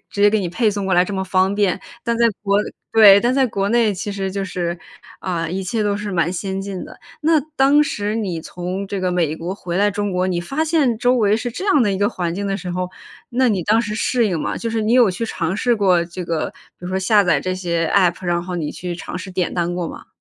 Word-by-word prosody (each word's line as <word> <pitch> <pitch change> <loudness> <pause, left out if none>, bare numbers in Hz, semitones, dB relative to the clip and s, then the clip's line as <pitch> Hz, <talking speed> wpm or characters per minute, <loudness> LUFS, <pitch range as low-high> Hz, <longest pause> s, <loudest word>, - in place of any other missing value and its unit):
直 200 - -2
接 205 - +7
给 220 - +2
你 180 - -2
配 215 +5 +1
送 200 -1 -3
过 190 - +2
来 180 +1 +5
这 205 - -6
么 190 0 -1
方 190 +1 +2
便。 200 -2 +1 0.3
但 235 -1 0
在 235 - +3 0.2
国 200 -1 +2 0.4
对， 205 -3 +8
但 245 +2 +1
在 270 - +3
国 200 -3 -1
内 230 -2 +3
其 200 +2 -4
实 195 -1 -3
就 195 0 -2
是， 175 -2 -3 0.4
啊， 170 -3 -2
一 190 +3 -3
切 220 +4 -1
都 205 -1 +1
是 210 -1 -4
蛮 170 0 +1
先 190 +1 -3
进 195 -2 -5
的。 - - -13 0.2
那 320 +1 +4 0.2
当 280 +2 +5
时 210 -5 -2
你 185 -7 -2
从 180 +4 -5
这 200 0 -4
个 185 -1 0
美 160 -3 0
国 175 +3 -4
回 175 -3 -5
来 205 +2 +3
中 205 -1 -2
国， 180 0 0
你 175 -1 -1
发 275 - -2
现 300 -8 +2
周 245 +2 +2
围 210 -2 +3
是 245 +2 -3
这 250 - -6
样 295 -9 +4
的 205 - +2
一 190 - -2
个 205 0 +2
环 175 -2 -3
境 200 +1 -3
的 195 0 -1
时 180 -3 -6
候， 180 0 -2 0.4
那 255 +1 +2
你 190 -4 0
当 220 +2 +3
时 210 -2 -4
适 240 0 +1
应 170 -4 -1
吗？ - - -2
就 230 - -3
是 225 -1 -1
你 215 +2 +1
有 240 -6 +5
去 230 +6 -3
尝 175 -4 -2
试 240 +2 +2
过 185 -4 +3
这 175 +1 -7
个， 165 -2 -2 0.3
比 180 - -8
如 - - -4
说 185 - -2
下 205 +2 +4
载 165 -5 +3
这 185 - -2
些 170 -3 -1
App， 180 -1 +2
然 175 0 0
后 180 0 -5
你 155 -3 -2
去 180 -1 -5
尝 180 +1 -6
试 190 0 -8
点 180 -1 -1
单 175 0 -1
过 175 -2 -2
吗？ - - -10
195 Hz, 295 characters per minute, -20 LUFS, 180-215 Hz, 0.4 s, 对